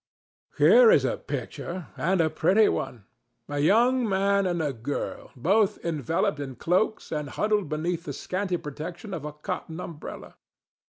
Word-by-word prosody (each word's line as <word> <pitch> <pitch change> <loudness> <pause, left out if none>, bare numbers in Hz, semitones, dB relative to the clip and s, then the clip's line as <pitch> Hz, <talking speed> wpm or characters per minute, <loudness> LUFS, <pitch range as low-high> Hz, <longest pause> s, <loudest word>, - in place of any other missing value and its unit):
Here - - +7
is 475 - +5
a - - 0
picture, 175 -1 -6
and 185 +2 +1
a 160 - +2
pretty 190 +7 +4
one—a 120 +4 -5
young 235 - +3
man 200 0 +2
and 175 -1 -1
a 150 -3 -1
girl, 120 +5 -4
both 195 - +2
enveloped 155 -1 0
in 135 -2 -5
cloaks 185 - 0
and 150 -2 -3
huddled 210 0 0
beneath 165 +3 -2
the 145 - -4
scanty 185 +5 -2
protection 170 +7 -7
of 155 -4 -5
a 150 - -5
cotton 160 +2 -5
umbrella. 165 -4 -8
165 Hz, 145 wpm, -26 LUFS, 145-195 Hz, -, Here